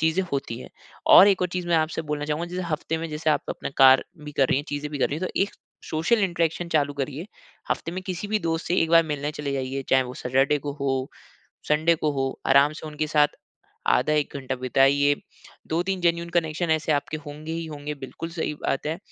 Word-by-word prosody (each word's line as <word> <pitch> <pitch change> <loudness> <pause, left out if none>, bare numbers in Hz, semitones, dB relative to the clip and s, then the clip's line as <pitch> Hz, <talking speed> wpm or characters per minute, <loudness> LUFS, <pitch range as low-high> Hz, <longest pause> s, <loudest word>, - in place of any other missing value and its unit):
चीज़ें 160 +4 +2
होती 135 -4 -2
हैं। - - -10 0.5
और 200 - +10
एक 195 -2 +2
और 180 - +1
चीज़ 180 0 -4
मैं 170 - +3
आपसे 160 0 0
बोलना 150 0 -2
चाहूँगा, 155 +3 -2
जैसे 180 +1 -3
हफ़्ते 160 +1 -2
में 165 +1 -4
जैसे 155 +1 0
आप 150 - +1
अपना - - -4
कार्य 130 0 +7 0.2
भी 150 - -7
कर 135 -2 +2
रही - - +3
हैं, 145 - -4
चीज़े 145 +1 -3
भी 145 -1 -5
कर - - +2
रही 145 - -2
हैं, 185 - -2
तो - - -3
एक 200 - -1 0.3
सोशल 160 +9 +1
इंटरेक्शन 170 -1 -1
चालू 145 -3 +1
करिए। 145 +4 -4 0.4
हफ़्ते 165 - -2
में 185 +1 -5
किसी 185 +1 -4
भी 215 +1 +1
दोस्त 165 -2 -2
से 175 - +1
1 165 - +2
बार 165 0 +7
मिलने 150 -1 -3
चले 150 -2 -4
जाइए, 135 0 -3
चाहे 130 0 +5
वो 125 0 -7
सैटरडे 135 +4 +2
को 145 - -2
हो, 135 -1 -1 0.6
संडे 155 +3 +3
को 155 -1 0
हो, 135 -1 -2
आराम 140 +2 +5
से 155 - -9
उनके 155 0 -3
साथ 150 -1 +4 0.7
आधा 155 - +1
1 150 -1 0
घंटा 135 -1 -4
बिताइए। 140 +3 +4 0.5
2-3 180 +4 -1
जेनुइन 170 0 +1
कनेक्शन 160 +1 -2
ऐसे 160 0 +2
आपके 145 +1 -1
होंगे 150 +2 -7
ही 165 0 -3
होंगे, 150 -1 -6
बिल्कुल 140 +4 -7
सही 165 -2 -3
बात 145 0 -2
है। 160 +2 -2
150 Hz, 225 wpm, -25 LUFS, 140-165 Hz, 0.7 s, और